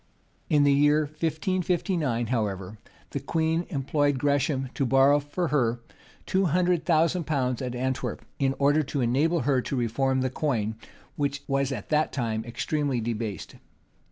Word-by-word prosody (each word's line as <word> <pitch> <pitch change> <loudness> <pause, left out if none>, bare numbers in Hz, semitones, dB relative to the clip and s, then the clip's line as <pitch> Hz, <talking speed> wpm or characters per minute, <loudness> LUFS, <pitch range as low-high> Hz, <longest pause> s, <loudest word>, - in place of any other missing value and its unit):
[] - - -39
In 145 - +5
the 140 -1 +5
year 145 +2 +4
1559, 160 - -1
however, 105 -3 -2 0.3
the - - -2
queen 160 +1 0
employed 145 -1 0
Gresham 140 -1 0
to 140 - -1
borrow 135 +3 +5
for 150 +4 -3
her 120 -5 +1 0.5
two 190 +1 +1
hundred 175 +1 +1
thousand 165 +1 +2
pounds 130 -5 -1
at 125 -1 -3
Antwerp, 130 +1 -3
in 135 -1 +1
order 145 +2 +3
to 140 -1 -3
enable 145 +8 +2
her 130 0 +2
to 135 - -4
reform 130 +2 0
the 130 -1 -1
coin, 115 -7 -1 0.4
which 145 0 -1
was 135 0 0
at 115 -7 -5
that 155 0 +2
time 110 -4 -2
extremely 135 +2 -1
debased. 110 -4 -4
140 Hz, 155 wpm, -26 LUFS, 125-155 Hz, 0.5 s, In